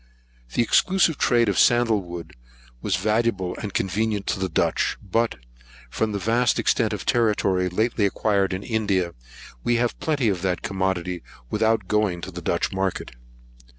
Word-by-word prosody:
The - - +4
exclusive 175 +5 +3
trade 120 -2 +3
of 100 - +1
sandlewood 105 -8 +2 0.5
was 100 - 0
valuable 105 -1 0
and 105 - -5
convenient 100 +2 -1
to - - -5
the 95 -1 -1
Dutch; 80 - 0
but, 115 +4 0 0.6
from 110 - -1
the 100 - -2
vast 115 +4 +1
extent - - +1
of - - -5
territory 100 -5 +2
lately 110 +2 +1
acquired 100 -1 +1
in 95 +1 -4
India, 100 -6 0 0.5
we 120 - +2
have 120 0 0
plenty 145 -6 0
of 95 -4 0
that 90 -1 -1
commodity 95 -2 -2 0.3
without 110 -2 +1
going 105 -4 +1
to - - -6
the - - -7
Dutch - - -1
market. 95 -1 -2
105 Hz, 150 wpm, -24 LUFS, 95-115 Hz, 0.6 s, The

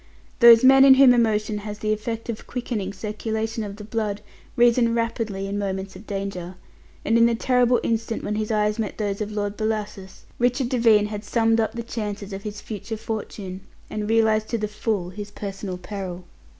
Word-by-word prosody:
Those 235 -1 +9
men 270 +1 +8
in 270 -1 +9
whom 265 -2 +7
emotion 215 -3 +1
has 205 0 -6
the 215 0 0
effect 225 +2 -4
of 230 -2 -6
quickening 230 -6 -3
circulation 220 +2 -3
of 200 -1 -6
the 210 - -10
blood 210 -1 -3 0.3
reason 235 -1 +4
rapidly 225 -4 -2
in 200 +1 -3
moments 190 -1 -4
of 200 +4 -12
danger, 195 -3 -5 0.5
and 225 +2 +3
in 230 - +6
the 235 - +1
terrible 250 0 +3
instant 225 0 -2
when 210 - -2
his 215 0 -2
eyes 210 0 +1
met 215 -4 -3
those 205 -1 -2
of 210 0 -3
Lord 205 -1 -2
Bellasis, 210 -3 -4 0.2
Richard 245 +1 +1
Devine 230 -5 +4
had 210 0 -5
summed 225 +1 +2
up 220 0 0
the 235 0 -5
chances 205 -3 -5
of 195 - -5
his 205 0 -7
future 220 +1 -6
fortune, 205 -3 -6 0.3
and 210 0 -3
realized 220 -1 +3
to 235 - -1
the 210 -1 -2
full 210 -4 -2
his 205 +2 -7
personal 195 -2 -6
peril. 185 -1 -6
215 Hz, 190 wpm, -23 LUFS, 205-230 Hz, 0.5 s, Those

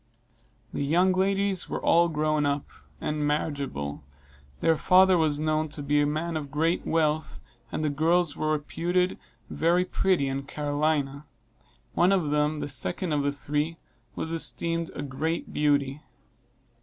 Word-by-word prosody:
The - - -2
young 175 +6 +3
ladies 195 0 +1
were - - -2
all 170 +1 +4
grown 155 -1 +1
up, 145 0 0 0.3
and 150 0 -2
marriageable; 140 - -2 0.6
their 165 -1 +3
father 185 +3 +5
was 155 -3 +1
known 155 0 0
to 145 0 -5
be 145 +1 +2
a 145 - +2
man 160 +3 -2
of 150 -3 -4
great 160 +5 0
wealth, 155 -1 0 0.3
and 155 - -2
the 150 - +1
girls 160 +2 +2
were 155 - -1
reputed 175 +4 -1 0.3
very 175 +2 +2
pretty 185 -7 +1
in 135 0 -2
Carolina; 145 -1 -1 0.7
one 180 +2 +4
of 175 -7 +1
them, 150 0 +1
the - - -3
second 150 +5 0
of 145 - +1
the 140 0 0
three, 150 +3 -2 0.4
was 160 - -4
esteemed 165 0 -2
a 145 - -4
great 155 +4 -3
beauty. 145 -1 +1
155 Hz, 150 wpm, -27 LUFS, 145-170 Hz, 0.7 s, father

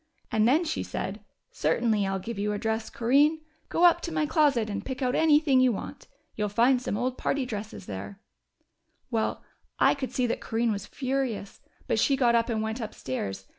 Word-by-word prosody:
And 220 0 +3
then 300 +8 +4
she 320 - -2
said, 195 +3 -4 0.3
'Certainly 210 +5 +1
I'll 195 0 -1
give 200 +3 -6
you 210 +1 0
a - - -2
dress, 220 +1 -2
Corinne. 285 +7 +3 0.3
Go 345 - +3
up 345 0 +5
to 335 - -4
my 315 -1 +1
closet 290 -7 +2
and 205 -1 -4
pick 260 +2 -4
out 250 0 +1
anything 300 -3 +4
you 255 -1 +5
want. 205 - -7 0.3
You'll 210 -1 -1
find 240 +5 +3
some 205 - -2
old 255 +2 -2
party 275 -2 0
dresses 215 -3 -6
there!' 100 - -7 0.9
"Well, 225 -2 -1 0.3
I - - +5
could 275 -2 -5
see 250 - 0
that 235 - -2
Corinne 230 0 0
was 200 -1 -4
furious, 260 -6 -3 0.2
but - - 0
she 275 - +3
got 245 -3 +3
up 230 +1 +2
and 220 -2 -1
went 220 +2 -3
upstairs. 115 - -5
235 Hz, 195 wpm, -27 LUFS, 210-270 Hz, 0.9 s, up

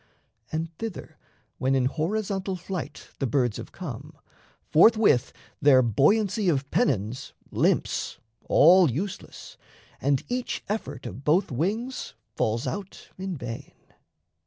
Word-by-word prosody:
And 165 +1 -3
thither 225 -4 -6 0.4
when 130 +1 +2
In 130 -1 +2
horizontal 190 +6 -1
flight 175 -4 -6
the 135 - 0
birds 120 -2 +1
have - - -8
come, 150 -2 -8 0.5
Forthwith 205 - +5 0.3
their 135 -3 +6
buoyancy 195 - +2
of 140 -4 0
pennons 115 -1 0 0.2
limps, - - 0 0.3
All 175 +1 +6
useless, 175 - -6 0.4
and 140 -1 +1
each 250 0 -3
effort 215 +2 -4
of 135 - -7
both 160 +5 +2
wings 205 - -2 0.2
Falls 115 +1 0
out 200 -1 -6
in 190 -3 -4
vain. 120 -3 -7
160 Hz, 115 wpm, -26 LUFS, 130-195 Hz, 0.5 s, their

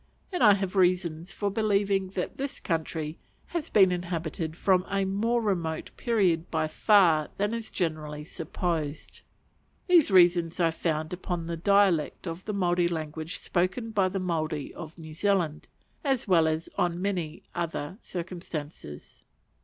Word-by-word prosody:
And 360 - -2
I 210 -3 +8
have 195 -1 -3
reasons 180 -2 +1
for 200 0 -2
believing 200 -2 +1
that 180 - -3
this 275 +1 -4
country 160 -2 -3 0.3
has 335 -2 -3
been 190 -3 +5
inhabited 170 -2 -3
from 185 -1 +3
a 195 0 +1
more 225 +5 0
remote 170 -6 -1
period 185 -8 +1
by 155 -1 0
far 165 -3 +4
than 205 +2 0
is 230 -1 -4
generally 155 -4 -3
supposed. 160 -2 -4 0.6
These 350 - +5
reasons 175 -2 +4
I 165 -2 +3
found 160 0 -2
upon 175 -2 -3
the 170 0 -3
dialect 190 -2 +2
of 165 +2 -5
the 210 - -2
Maori 175 -3 +2
language 160 -1 -4
spoken 190 +6 -1
by 195 -4 +2
the 195 +1 -3
Maori 155 -5 -2
of 160 +1 -9
New 160 -2 -9
Zealand, 175 -3 0 0.4
as 270 -6 0
well 170 -4 +5
as 160 +1 -1
on 175 -1 +1
many 180 -5 -2
other 170 +1 -4
circumstances. 165 - -7
175 Hz, 145 wpm, -28 LUFS, 160-200 Hz, 0.6 s, I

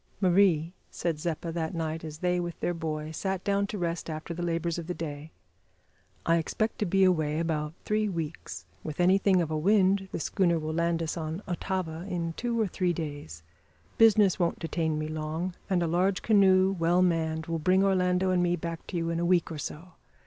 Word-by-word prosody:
"Marie," 180 -3 +3 0.2
said 165 -3 -2
Zeppa 165 0 -3
that 165 +1 -3
night 160 -1 -3
as 155 -1 -7
they, 180 +1 0
with 175 -1 -4
their 175 - 0
boy, 155 -2 -4
sat 190 +3 -3
down 200 0 +1
to 210 - -5
rest 170 -2 -3
after 155 +2 -5
the 170 - -5
labours 170 0 -1
of 165 - -7
the 180 - -3
day, 150 -1 -6 1.0
"I 165 0 +4
expect 215 +7 -1
to 210 - 0
be 195 +2 +3
away 155 -5 +2
about 160 -2 -2
three 215 0 +1
weeks. 165 -4 -5 0.2
With 155 0 -6
anything 185 0 +4
of 160 - -5
a 155 - 0
wind 195 +1 +3
the - - -3
schooner 170 0 +1
will 155 0 -3
land 170 0 0
us 165 +2 -3
on 160 +3 -4
Otava 175 -1 -3
in 170 -2 -2
two 235 +4 -2
or 220 - +3
three 180 -2 0
days. 145 - -6 0.6
Business 210 -4 +5
won't 170 -1 +1
detain 160 -2 -1
me 155 0 -2
long, 155 +3 -3 0.2
and 180 -3 +2
a - - 0
large 180 +3 +1
canoe, 190 -3 +5
well 175 +2 +3
manned, 160 -2 0
will 165 -1 -2
bring 185 +4 +3
Orlando 185 -1 +2
and 180 -1 +2
me 175 0 +2
back 165 -1 -6
to 180 - -4
you 165 0 -1
in 165 - -1
a - - 0
week 175 -1 +2
or 155 - -5
so. 160 +5 -6
170 Hz, 205 wpm, -28 LUFS, 160-185 Hz, 1.0 s, Business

